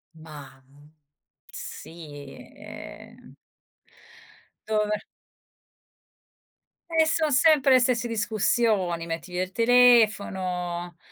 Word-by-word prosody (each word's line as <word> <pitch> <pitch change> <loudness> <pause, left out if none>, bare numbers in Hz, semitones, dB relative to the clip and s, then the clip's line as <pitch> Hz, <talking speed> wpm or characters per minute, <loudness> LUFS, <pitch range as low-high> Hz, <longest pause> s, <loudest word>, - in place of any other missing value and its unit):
Mah, 150 -4 -13 0.9
sì, 145 -4 -10 0.2
ehm - - -12 1.3
Dove 210 -1 0 2.0
E 320 - +5
son 315 -1 0
sempre 275 0 +4
le 255 - +6
stesse 245 -1 0
discussioni: 210 -5 0
metti 165 +1 -6
via 180 +1 -1
il 185 - -8
telefono, 190 -7 +2
205 Hz, 75 wpm, -25 LUFS, 170-240 Hz, 2.0 s, le